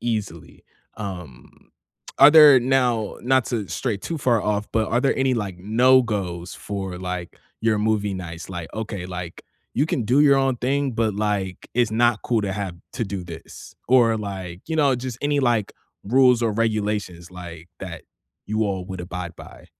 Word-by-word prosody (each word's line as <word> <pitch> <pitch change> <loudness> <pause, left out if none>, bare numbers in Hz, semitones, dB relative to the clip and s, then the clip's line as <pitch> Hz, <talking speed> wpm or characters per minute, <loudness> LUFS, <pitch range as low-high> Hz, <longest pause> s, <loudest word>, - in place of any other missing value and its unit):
easily, 105 -8 -4 0.3
um, 90 -11 -9 0.5
are 145 - +9
there 150 -4 +9
Now, 125 -4 +1
not 130 0 +2
to 110 -6 -3
stray 115 -6 -2
too 165 - -4
far 120 -5 +2
off, 105 0 -1
but 110 -1 +1
are 120 - +2
there 135 - +2
any, 135 -1 +2
like, 100 -6 -4
no-goes 105 -5 +2
for, 95 -3 -5
like, 90 -1 -5 0.2
your 110 -1 +2
movie 105 -2 0
nights, 85 -2 -7
like, 90 -3 -7
"Okay," 105 -5 -5
like, 90 -2 -7 0.3
"you 145 - +2
can 125 -7 -1
do 125 +6 +3
your 140 -2 +6
own 135 -2 +1
thing, 135 +2 0
but, 110 -2 0
like, 100 -3 -2
it's 120 -3 +2
not 120 0 +2
cool 115 -3 +1
to 95 - -2
have 95 -3 -4 0.2
to 120 - -1
do 95 -3 -5
this." 85 -2 -11
Or, 120 -3 +5
like, 95 -4 -6
you 160 - -1
know, 140 -4 +4
just 125 -1 -5
any, 145 0 +1
like, 120 -5 +1 0.3
rules 125 +2 +4
or 115 -2 +1
regulations, 105 -5 -2
like, 85 -2 -10
that - - -7 0.4
you 110 +1 0
all 95 -2 -2
would 95 -2 -6
abide 90 -1 -6
by? - - -13
110 Hz, 175 wpm, -23 LUFS, 95-125 Hz, 0.5 s, are